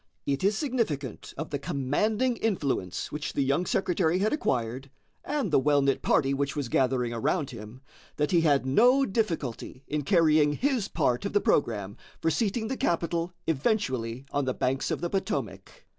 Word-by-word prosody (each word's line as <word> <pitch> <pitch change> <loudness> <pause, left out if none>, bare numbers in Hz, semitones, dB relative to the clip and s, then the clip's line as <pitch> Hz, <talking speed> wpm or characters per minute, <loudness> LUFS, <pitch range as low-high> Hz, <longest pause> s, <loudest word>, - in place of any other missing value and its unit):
It 140 +3 -1
is 200 +2 +2
significant 215 - -2
of 155 +3 -5
the 145 - -2
commanding 195 - 0
influence 140 - -2
which 150 0 -4
the 140 - +1
young 140 +7 +1
secretary 180 -2 +1
had 210 +6 +1
acquired, 130 - -1 0.3
and 285 - -2
the - - +5
well 145 +1 +3
knit 135 -1 +1
party 135 -2 +2
which 140 +1 -1
was 140 -5 -3
gathering 125 -1 +1
around 140 +6 -1
him, 115 +2 -10 0.3
that 150 0 0
he 175 -2 +4
had 145 -4 +3
no 245 - +4
difficulty 165 - -3
in 150 0 -2
carrying 155 -2 +4
his 255 - 0
part 125 -10 0
of 200 - -3
the 205 - +4
programme 105 - 0 0.2
for 165 - +1
seating 220 +5 0
the 265 - -3
capital 170 0 0
eventually 130 - -1
on 145 -1 0
the 130 - -1
banks 135 +1 -1
of - - -2
the 175 - -1
Potomac. 195 +1 -4
150 Hz, 175 wpm, -27 LUFS, 130-195 Hz, 0.3 s, the